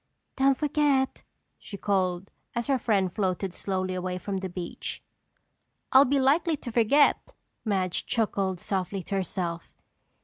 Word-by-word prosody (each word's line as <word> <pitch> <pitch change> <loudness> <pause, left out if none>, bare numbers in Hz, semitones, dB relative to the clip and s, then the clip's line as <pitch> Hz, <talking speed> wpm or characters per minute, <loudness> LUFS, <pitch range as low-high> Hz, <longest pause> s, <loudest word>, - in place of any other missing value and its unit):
"Don't 270 -1 +3
forget," 290 -2 +1 0.4
she 200 - -9
called, 190 -2 0 0.2
as 235 0 -1
her 270 -2 +1
friend 195 -6 +1
floated 190 -2 -1
slowly 185 -1 -2
away 180 0 -3
from 195 +2 -3
the 190 0 -4
beach. 175 -1 -6 0.9
"I'll 265 +2 +8
be 280 +2 +2
likely 300 +4 +3
to 245 - -7
forget!" 240 +6 +3 0.3
Madge 190 -4 -1
chuckled 195 -5 0
softly 190 0 -2
to 200 - -4
herself. 175 -2 -3
200 Hz, 135 wpm, -27 LUFS, 185-265 Hz, 0.9 s, I'll